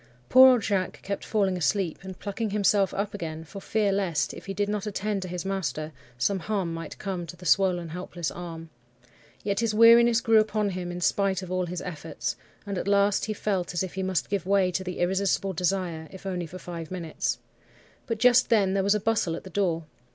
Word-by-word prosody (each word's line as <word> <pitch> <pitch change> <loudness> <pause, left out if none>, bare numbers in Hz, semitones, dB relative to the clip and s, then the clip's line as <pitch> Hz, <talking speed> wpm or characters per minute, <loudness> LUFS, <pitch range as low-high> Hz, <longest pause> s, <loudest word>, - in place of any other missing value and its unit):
"Poor 260 0 +9
old 240 -4 0
Jacques 195 -3 -1
kept 200 0 -4
falling 195 -4 +1
asleep, 180 0 0
and 190 -1 -8
plucking 210 +2 -3
himself 200 -1 +2
up 200 +1 -3
again 160 -5 -5
for 195 +5 -10
fear 210 -1 +1
lest, 190 -5 0
if - - -11
he 195 - -3
did 205 +1 0
not 210 0 -2
attend 205 0 -2
to 185 - -5
his 180 -1 -5
master, 185 -5 -2 0.3
some 195 +10 +1
harm 190 -3 -2
might 165 -1 -7
come 185 -4 -4
to 175 - -8
the 180 - -12
swollen, 180 -1 +2
helpless 175 -1 -4
arm. 165 -2 -8 0.7
Yet 200 0 0
his 225 -2 0
weariness 230 +1 +7
grew 225 -1 +5
upon 215 -1 +1
him 180 -1 -4
in 175 0 -6
spite 195 +1 +1
of 180 - -8
all 185 -1 0
his 175 0 -5
efforts, 165 -2 -4 0.3
and 200 -2 -3
at - - -4
last 200 0 +3
he 215 - -2
felt 190 -4 -2
as 175 - +1
if 185 - -5
he 190 - -3
must 190 0 -1
give 195 -2 -1
way 195 -2 +3
to 190 +1 -2
the 180 -1 -5
irresistible 190 +1 +1
desire, 180 -2 -1
if 190 0 -12
only 180 -3 -3
for 180 - -9
five 170 -3 -7
minutes. 170 -4 -2 0.7
But 230 - -1
just 250 +2 +5
then 200 -4 +3
there 195 - +2
was 200 +2 +3
a - - +1
bustle 210 -6 0
at - - -8
the 190 - -10
door. 170 -4 0
190 Hz, 215 wpm, -27 LUFS, 175-205 Hz, 0.7 s, Poor